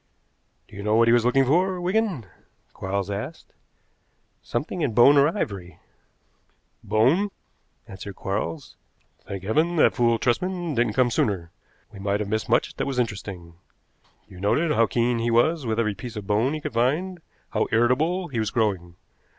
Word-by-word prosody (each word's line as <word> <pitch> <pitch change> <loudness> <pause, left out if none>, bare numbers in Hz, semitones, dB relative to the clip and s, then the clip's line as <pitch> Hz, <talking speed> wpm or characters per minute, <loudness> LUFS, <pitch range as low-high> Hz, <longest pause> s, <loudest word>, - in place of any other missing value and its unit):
"Do - - -15
you 100 - -6
know 105 +1 +1
what 115 +1 +4
he - - +5
was 120 -1 +4
looking 135 +2 +3
for, 180 +7 +2
Wigan?" 185 - 0 0.5
Quarles 100 +1 -3
asked. 105 +11 -6 0.9
"Something 150 +8 -4
in 125 -8 -1
bone 135 +4 +7
or 140 0 +6
ivory." 100 - -4 1.1
"Bone," 120 - +2 0.6
answered 95 0 -9
Quarles. 105 - -4 0.5
"Thank 95 -1 -6
heaven 155 - +1
that 155 - +4
fool 120 -2 +2
Tresman 175 +8 -1
didn't 120 -3 +1
come 125 +1 +2
sooner! 90 -7 -1 0.4
We 100 - -10
might 100 +1 -1
have 105 -1 -3
missed 110 +1 -2
much - - +2
that - - -2
was 135 -2 -3
interesting. 100 -7 -4 0.7
You 90 - -13
noted 150 - +1
how 115 -6 +3
keen 120 0 0
he 115 +1 0
was 130 +5 +2
with 110 0 0
every 105 -3 +1
piece 120 +3 -8
of 105 -2 -6
bone 110 +9 +1
he 155 - -5
could - - -5
find, 155 +10 0 0.3
how - - 0
irritable 155 +11 +1
he 120 -5 -3
was 110 -1 0
growing. 95 -7 -1
120 Hz, 165 wpm, -24 LUFS, 105-150 Hz, 1.1 s, bone